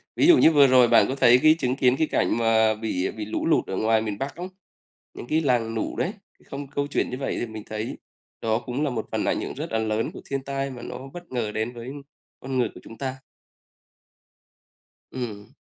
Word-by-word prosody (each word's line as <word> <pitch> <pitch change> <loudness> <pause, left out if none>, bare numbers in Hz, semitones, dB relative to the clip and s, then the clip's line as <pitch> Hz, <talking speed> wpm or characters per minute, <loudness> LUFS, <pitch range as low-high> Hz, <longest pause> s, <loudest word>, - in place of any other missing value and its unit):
Ví - - +3
dụ 345 -2 +8
như 160 - +6
vừa 145 -3 +6
rồi 125 -2 +6
bạn - - +6
có 130 - -2
thấy 125 -2 +6
cái 155 0 +7
chứng 125 0 0
kiến 130 -1 +3
cái 160 - +1
cảnh 90 -2 +1
mà 110 -1 +3
bị 105 -4 -2
bị 110 -1 -6
lũ 110 - -3
lụt 165 - +3
ở 95 - -3
ngoài 110 0 +2
miền 105 -2 -3
Bắc 135 +5 -4
không? 180 +2 -6 0.7
Những - - -8
cái 155 +5 +1
làng 120 -6 +1
lũ 110 - -3
đấy. - - -1 0.3
Không 140 +1 -7
câu 140 +1 -2
chuyện 145 - -1
như 125 - -4
vậy 135 - -2
thì - - -2
mình 110 -2 -8
thấy 110 +1 -4 0.4
đó 110 0 +1
cũng 125 +4 -2
là 145 - 0
một 115 -3 -3
phần - - -1
ảnh - - 0
hưởng - - -5
rất - - -6
là 110 - +1
lớn 110 0 -1
của - - -9
thiên 135 -1 -1
tai 135 0 -3
mà 125 -2 -9
nó 130 - -7
bất 175 0 -10
ngờ 115 -4 -2
đến 110 +3 -2
với 120 +2 -8 0.5
con 130 0 -3
người 120 -3 +2
của - - -11
chúng 115 - -12
ta. 130 -1 -3 2.0
Ừm. 110 -5 -6
125 Hz, 235 wpm, -25 LUFS, 110-135 Hz, 2.0 s, dụ